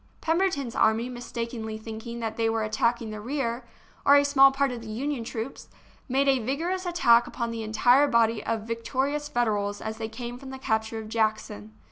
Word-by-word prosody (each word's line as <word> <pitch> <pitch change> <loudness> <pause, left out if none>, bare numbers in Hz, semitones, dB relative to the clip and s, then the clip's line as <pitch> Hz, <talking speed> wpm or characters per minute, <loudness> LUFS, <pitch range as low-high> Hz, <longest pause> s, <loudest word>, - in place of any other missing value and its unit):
Pemberton's 325 -7 0
army, 225 +3 +2
mistakenly 230 -2 -5
thinking 225 +2 -7
that 225 -1 -3
they 225 -1 +1
were 225 -1 0
attacking 220 +1 0
the 215 0 -6
rear, 240 -1 -3 0.4
or 280 - +7
a 285 0 +5
small 275 -1 +6
part 275 0 +1
of 240 -2 -6
the 225 - -10
Union 260 +3 -3
troops, 230 +2 -6 0.4
made 270 +2 +2
a 270 -1 +4
vigorous 345 +9 -2
attack 240 -10 +4
upon 235 -2 -3
the 230 -1 -4
entire 245 +6 +4
body 230 -3 +2
of 225 -1 -1
victorious 265 +6 -2
Federals 210 -6 0
as 220 0 -5
they 220 -1 -3
came 240 +1 -7
from 270 0 -10
the 265 - -7
capture 220 -3 -1
of 220 -1 -6
Jackson. 215 - -2
235 Hz, 185 wpm, -26 LUFS, 220-270 Hz, 0.4 s, or